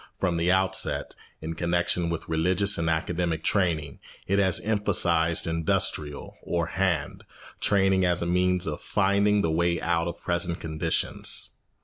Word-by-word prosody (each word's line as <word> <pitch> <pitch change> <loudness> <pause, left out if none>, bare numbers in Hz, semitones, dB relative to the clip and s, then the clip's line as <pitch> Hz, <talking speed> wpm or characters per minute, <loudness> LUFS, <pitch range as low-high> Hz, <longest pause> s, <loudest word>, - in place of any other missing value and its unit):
From 90 -3 0
the 85 +2 +2
outset, 95 0 0 0.3
in 80 +1 -4
connection 85 +1 0
with 85 -1 -4
religious 90 +5 +1
and 80 0 0
academic 80 0 -1
training, 80 -8 0 0.3
it 100 +2 +1
has 95 -3 +3
emphasised 85 -6 +1
industrial, 80 -3 0
or 85 -1 -1
hand, 85 -4 -1 0.4
training 95 -2 +3
as 90 -1 +1
a - - -2
means 90 +1 +1
of 75 -2 -4
finding 100 +1 +2
the 80 - 0
way 85 +1 +1
out 85 0 0
of 85 - -5
present 85 -1 -1
conditions. 80 0 -2
85 Hz, 140 wpm, -26 LUFS, 80-95 Hz, 0.4 s, has